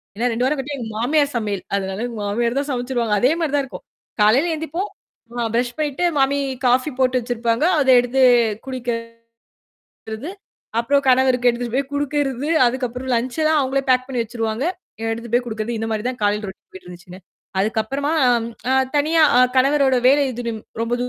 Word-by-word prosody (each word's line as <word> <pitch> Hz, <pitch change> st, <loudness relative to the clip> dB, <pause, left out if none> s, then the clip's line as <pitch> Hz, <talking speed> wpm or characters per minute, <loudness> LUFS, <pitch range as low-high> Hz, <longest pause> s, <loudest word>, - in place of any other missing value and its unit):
ஏன்னா 235 Hz, +4 st, 0 dB
2 235 Hz, +2 st, 0 dB
வாரம் 285 Hz, +2 st, 0 dB
கிட்ட 270 Hz, +2 st, -5 dB
எங்க 235 Hz, -4 st, -5 dB
மாமியார் 285 Hz, +5 st, +1 dB
சமையல். 210 Hz, -5 st, -2 dB
அதனால 190 Hz, +1 st, -3 dB, 0.2 s
மாமியார் 235 Hz, +5 st, -1 dB
தான் 285 Hz, +1 st, -4 dB
சமைச்சுருவாங்க. 245 Hz, -3 st, -1 dB
அதே 250 Hz, +6 st, +3 dB
மாரி 320 Hz, -4 st, -1 dB
தான் 285 Hz, -, +2 dB
இருக்கும். 265 Hz, -, -10 dB, 0.4 s
காலையில 245 Hz, +11 st, +4 dB
எழுந்திப்போம் 320 Hz, +6 st, -4 dB, 0.5 s
ஆ -, -, 0 dB
பிரஷ் 240 Hz, +1 st, 0 dB
பண்ணிட்டு 300 Hz, +1 st, -2 dB
மாமி 275 Hz, +1 st, +2 dB, 0.3 s
காஃபி 255 Hz, +4 st, +3 dB
போட்டு 255 Hz, -1 st, +2 dB
வச்சிருப்பாங்க. 235 Hz, +1 st, -1 dB, 0.2 s
அத 270 Hz, -2 st, +2 dB
எடுத்து 245 Hz, +2 st, 0 dB, 0.4 s
குடிக்கறது. 240 Hz, -3 st, -4 dB, 1.7 s
அப்புறம் 280 Hz, +4 st, +2 dB
கணவருக்கு 255 Hz, -1 st, +4 dB
எடுத்துட்டு 235 Hz, 0 st, -5 dB
போய் 275 Hz, +1 st, -1 dB
குடுக்கறது, 285 Hz, -1 st, -1 dB, 0.2 s
அதுக்கப்புறம் 250 Hz, +1 st, -3 dB
லஞ்சல்லாம் 305 Hz, +7 st, +1 dB
அவுங்களே 270 Hz, 0 st, 0 dB
பேக் 255 Hz, 0 st, +3 dB
பண்ணி 255 Hz, -3 st, -1 dB
வச்சுருவாங்க. 225 Hz, +1 st, -3 dB, 0.5 s
எடுத்துட்டு 230 Hz, 0 st, -5 dB
போய் 245 Hz, +1 st, +2 dB
குடுக்குறது 225 Hz, 0 st, -3 dB
இந்த 225 Hz, -, -2 dB
மாரி 215 Hz, -1 st, -2 dB
தான் 255 Hz, -1 st, -5 dB
காலையில 210 Hz, +1 st, +1 dB
ரோட்டின் 190 Hz, -, -13 dB
போயிட்டு 185 Hz, -1 st, -12 dB
இருந்துச்சுங்க. 180 Hz, +1 st, -11 dB, 0.4 s
அதுக்கப்புறமா 225 Hz, +8 st, -1 dB, 0.2 s
அம் 235 Hz, -2 st, +1 dB, 0.2 s
அ -, -, +3 dB, 0.2 s
தனியா 315 Hz, +3 st, +3 dB, 0.2 s
அ -, -, +7 dB, 0.2 s
கணவரோட 270 Hz, 0 st, +3 dB
வேலை 285 Hz, +2 st, +4 dB
தூரம் 230 Hz, -2 st, -4 dB, 0.2 s
ரொம்ப 230 Hz, +1 st, 0 dB
250 Hz, 160 wpm, -20 LUFS, 230-275 Hz, 1.7 s, அ